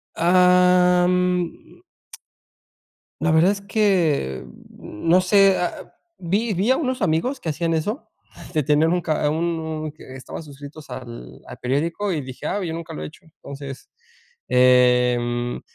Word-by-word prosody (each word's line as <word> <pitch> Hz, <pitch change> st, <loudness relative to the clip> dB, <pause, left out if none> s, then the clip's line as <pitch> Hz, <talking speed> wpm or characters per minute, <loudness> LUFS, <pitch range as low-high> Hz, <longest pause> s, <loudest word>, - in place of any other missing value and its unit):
Am. 180 Hz, -, +2 dB, 1.4 s
La 160 Hz, 0 st, +2 dB
verdad 160 Hz, +4 st, +4 dB
es 200 Hz, -1 st, -4 dB
que, 180 Hz, -, 0 dB, 0.3 s
mm, 105 Hz, +11 st, -7 dB
no 180 Hz, +2 st, +5 dB
sé, 195 Hz, +1 st, +4 dB
a 180 Hz, -, 0 dB
a -, -, -11 dB, 0.3 s
vi 205 Hz, +6 st, -1 dB
vi 195 Hz, +7 st, +1 dB
a 260 Hz, -, +3 dB
unos 260 Hz, -4 st, -2 dB
amigos 190 Hz, -, 0 dB
que 165 Hz, -, -4 dB
hacían 165 Hz, +2 st, -1 dB
eso, 205 Hz, -, -3 dB, 0.4 s
de 155 Hz, -, +1 dB
tener 150 Hz, +3 st, +2 dB
un 175 Hz, +1 st, 0 dB
ca 155 Hz, -3 st, 0 dB
un 165 Hz, +2 st, -1 dB
un 155 Hz, -1 st, -5 dB
que 140 Hz, -3 st, -13 dB
estaban 130 Hz, +4 st, -8 dB
suscritos 145 Hz, +1 st, -12 dB
al 115 Hz, -, -9 dB
al -, -, -10 dB
periódico 165 Hz, +10 st, -2 dB
y 160 Hz, -4 st, -2 dB
dije: 130 Hz, -1 st, -8 dB
"Ah, 200 Hz, 0 st, -2 dB
yo 165 Hz, -2 st, -4 dB
nunca 165 Hz, 0 st, -7 dB
lo 75 Hz, -, -6 dB
he -, -, -5 dB
hecho". 75 Hz, -, -17 dB
Entonces, 140 Hz, -3 st, -10 dB, 0.6 s
em, 125 Hz, -1 st, +2 dB
165 Hz, 150 wpm, -22 LUFS, 140-180 Hz, 1.4 s, no